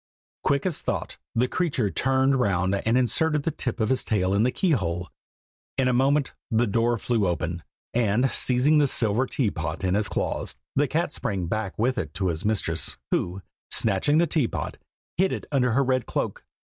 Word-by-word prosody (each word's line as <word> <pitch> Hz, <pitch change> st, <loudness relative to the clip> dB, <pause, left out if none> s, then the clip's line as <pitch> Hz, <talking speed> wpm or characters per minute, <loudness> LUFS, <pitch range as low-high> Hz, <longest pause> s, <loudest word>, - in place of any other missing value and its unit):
Quick 140 Hz, 0 st, +1 dB
as 180 Hz, -5 st, -1 dB
thought -, -, -3 dB, 0.2 s
the 120 Hz, +2 st, +2 dB
creature 135 Hz, -, 0 dB
turned 135 Hz, +1 st, +2 dB
round 95 Hz, -4 st, +1 dB
and 115 Hz, +4 st, +1 dB
inserted 150 Hz, +4 st, +1 dB
the 165 Hz, -, 0 dB
tip 125 Hz, -4 st, -4 dB
of 110 Hz, -1 st, +1 dB
his 130 Hz, -, +1 dB
tail 95 Hz, -4 st, 0 dB
in 100 Hz, -, +3 dB
the 120 Hz, -, +3 dB
key 180 Hz, +6 st, 0 dB
hole. 90 Hz, -, -1 dB, 0.7 s
In 135 Hz, -1 st, +2 dB
a 125 Hz, -, +2 dB
moment 135 Hz, +3 st, +2 dB, 0.2 s
the 115 Hz, +1 st, +2 dB
door 115 Hz, +2 st, +1 dB
flew 110 Hz, -3 st, 0 dB
open, 85 Hz, 0 st, -2 dB, 0.3 s
and 120 Hz, +2 st, +2 dB
seizing 135 Hz, +5 st, +3 dB
the 145 Hz, -, +4 dB
silver 120 Hz, +1 st, +1 dB
teapot 100 Hz, -, -2 dB
in 90 Hz, -1 st, +1 dB
his 105 Hz, +1 st, 0 dB
claws, -, -, -2 dB, 0.2 s
the 145 Hz, +1 st, +3 dB
cat 165 Hz, +1 st, -1 dB
sprang 95 Hz, -4 st, -2 dB
back 100 Hz, +2 st, -3 dB
with 125 Hz, +3 st, +1 dB
it 75 Hz, -2 st, -5 dB
to 95 Hz, -2 st, 0 dB
his 80 Hz, -2 st, -3 dB
mistress, 95 Hz, -6 st, +1 dB
who, 90 Hz, +2 st, -1 dB, 0.3 s
snatching 115 Hz, +8 st, +2 dB
the 170 Hz, -, +4 dB
teapot, 150 Hz, -6 st, -1 dB, 0.4 s
hid 190 Hz, +2 st, +3 dB
it -, -, -4 dB
under 125 Hz, -4 st, +2 dB
her 140 Hz, +4 st, +3 dB
red 130 Hz, -2 st, 0 dB
cloak. -, -, -3 dB
120 Hz, 190 wpm, -25 LUFS, 100-135 Hz, 0.7 s, the